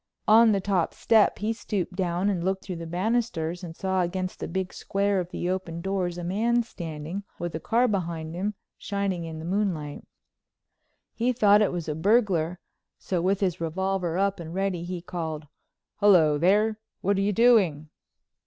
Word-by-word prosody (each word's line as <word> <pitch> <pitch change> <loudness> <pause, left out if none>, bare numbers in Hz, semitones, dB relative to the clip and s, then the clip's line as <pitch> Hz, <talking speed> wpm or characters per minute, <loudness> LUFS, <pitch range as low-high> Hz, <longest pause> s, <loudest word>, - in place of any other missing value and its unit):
On 225 +1 +7
the 200 - +2
top 190 -3 0
step 220 -2 +3
he 215 +3 -1
stooped 200 -5 -3
down 180 0 0
and 185 -4 0
looked 190 +1 -1
through 185 -3 -5
the 165 0 -6
banisters, 180 -2 -1
and 165 -2 -7
saw 190 0 0
against 185 +1 -3
the - - -4
big 190 +2 -3
square 200 0 0
of 175 -1 -4
the 175 - -4
open 180 -2 -3
doors 180 -1 -2
a 175 - -5
man 230 +7 +1
standing, 165 -3 -6 0.2
with 175 -1 -4
a 160 - -3
car 235 +8 +2
behind 170 -6 -2
him 200 +4 -2 0.2
shining 200 -4 -2
in 160 -1 -6
the 160 - -7
moonlight. 175 -6 -2 1.1
He 240 +2 +1
thought 210 -4 +5
it 210 - +2
was 175 -3 -4
a 155 - -1
burglar, 180 -1 +2 0.4
so, 180 -3 -2
with 195 +3 +1
his 180 -4 0
revolver 180 +1 -1
up 195 0 +1
and 165 0 -7
ready, 190 -3 -1
he 175 -1 -5
called: 160 -4 -4 0.5
"Hello, 175 -8 +5
there. 210 +5 +3 0.2
What 200 +2 +2
are - - +2
you 200 +1 +2
doing?" 195 -10 +3
185 Hz, 180 wpm, -26 LUFS, 170-205 Hz, 1.1 s, On